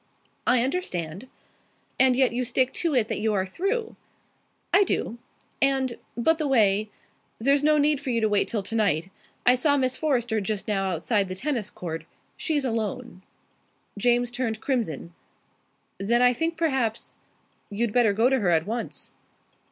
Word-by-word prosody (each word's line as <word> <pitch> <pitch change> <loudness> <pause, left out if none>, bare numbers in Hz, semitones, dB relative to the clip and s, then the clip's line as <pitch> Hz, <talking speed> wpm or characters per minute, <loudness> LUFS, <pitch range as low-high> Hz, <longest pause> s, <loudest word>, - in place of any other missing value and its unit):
"I 250 -2 +4
understand." 200 - -3 0.7
"And 260 -1 +5
yet 260 -2 +3
you 250 +1 -1
stick 255 +2 +1
to 330 -5 -1
it 230 -4 +2
that - - -2
you 215 0 0
are 190 -1 +1
through?" 400 - -2 0.8
"I 405 - +7
do. 240 - -2 0.4
And, 265 -3 +1 0.2
by 280 +7 +3
the 310 -2 -2
way, 215 -5 +3 0.5
there's 275 +4 +2
no 305 0 +4
need 295 -1 +2
for 280 - -5
you 235 -2 +1
to 220 - +2
wait 205 -1 +2
till 215 -4 -2
tonight. 195 -5 0 0.3
I 250 - +7
saw 285 +3 +2
Miss 255 -1 0
Forrester 240 -7 0
just 200 0 -3
now 195 -2 0
outside 195 +3 0
the 185 - -5
tennis 235 -2 -2
court. 165 -2 -6 0.3
She's 295 -4 -1
alone." 220 -5 -3 0.7
James 240 +3 +2
turned 240 -3 -2
crimson. 210 - -2 0.9
"Then 235 +5 +2
I 250 0 +5
think 325 +6 -2
perhaps 265 -9 -1 0.3
" - - -41
"You'd 210 +1 -2
better 240 -4 +4
go 225 +4 +3
to 265 0 +2
her 195 -5 +1
at 165 -1 +2
once." 230 +3 -5
240 Hz, 165 wpm, -25 LUFS, 205-270 Hz, 0.9 s, I